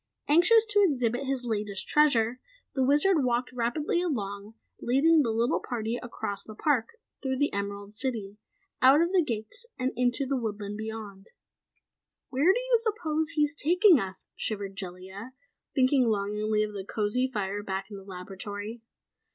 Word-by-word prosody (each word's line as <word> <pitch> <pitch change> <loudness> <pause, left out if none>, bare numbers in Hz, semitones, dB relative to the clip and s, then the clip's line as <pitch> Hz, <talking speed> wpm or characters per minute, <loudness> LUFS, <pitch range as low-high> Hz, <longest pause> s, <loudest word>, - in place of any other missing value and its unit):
Anxious 355 +9 +5
to 410 0 +4
exhibit 255 - +1
his 265 -2 -1
latest 205 -4 -2
treasure, 255 -5 +3 0.3
the 265 - +1
Wizard 295 +4 +3
walked 245 0 0
rapidly 250 +8 0
along, 210 - -4 0.3
leading 300 +6 +4
the 245 - 0
little 230 +2 +1
party 235 -1 -3
across 200 -4 -5
the 215 - -11
park, 280 - 0 0.2
through 265 -2 -1
the 290 +2 +1
Emerald 200 0 -4
City, 215 -4 -4 0.4
out 265 +3 +7
of 340 +2 +2
the 370 -3 +4
Gates 280 - -5
and 255 0 -1
into 245 +2 +1
the 270 +1 -1
thick - - -3
woodland 210 -2 -4
beyond. 215 -2 -7 1.0
"Where 285 +8 +4
do 445 - +1
you - - +2
suppose 330 -9 0
he 300 - +3
is 290 -1 +1
taking 350 - +5
us?" 190 -3 -5
shivered 200 -3 -3
Jellia, 190 +5 -8 0.4
thinking 260 -2 +4
longingly 210 0 0
of 210 0 -4
the 195 -2 -5
cozy 215 +6 0
fire 205 -2 -2
back 195 0 -4
in 200 - -7
the 195 - -11
laboratory. 200 +4 -7
235 Hz, 160 wpm, -28 LUFS, 205-290 Hz, 1.0 s, out